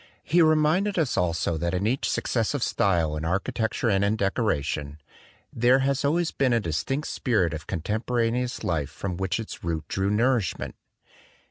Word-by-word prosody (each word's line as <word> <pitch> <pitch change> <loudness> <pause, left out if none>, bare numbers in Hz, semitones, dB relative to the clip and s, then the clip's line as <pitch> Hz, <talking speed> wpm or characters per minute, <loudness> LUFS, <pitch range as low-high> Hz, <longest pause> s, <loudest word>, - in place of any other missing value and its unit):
He 175 +3 +3
reminded 160 +6 +3
us 155 -7 +1
also 85 -2 0
that 85 +2 -1
in 95 +3 -1
each 125 +5 0
successive 120 +3 0
style 85 -6 +1
in 75 - -4
architecture 110 +7 -1
and 100 -2 +2
in 100 +2 +2
decoration 80 - -1 0.6
"there 120 +3 +4
has 140 0 0
always 165 +4 +1
been 130 -3 +1
a 115 - +3
distinct 105 - -2
spirit 100 - 0
of 80 - -7
contemporaneous 115 +6 -1
life 75 -5 -1
from 95 -3 -5
which 95 0 -1
its 115 - -7
root 80 -2 -3
drew 95 +1 -1
nourishment." 115 -2 0
110 Hz, 155 wpm, -26 LUFS, 85-130 Hz, 0.6 s, there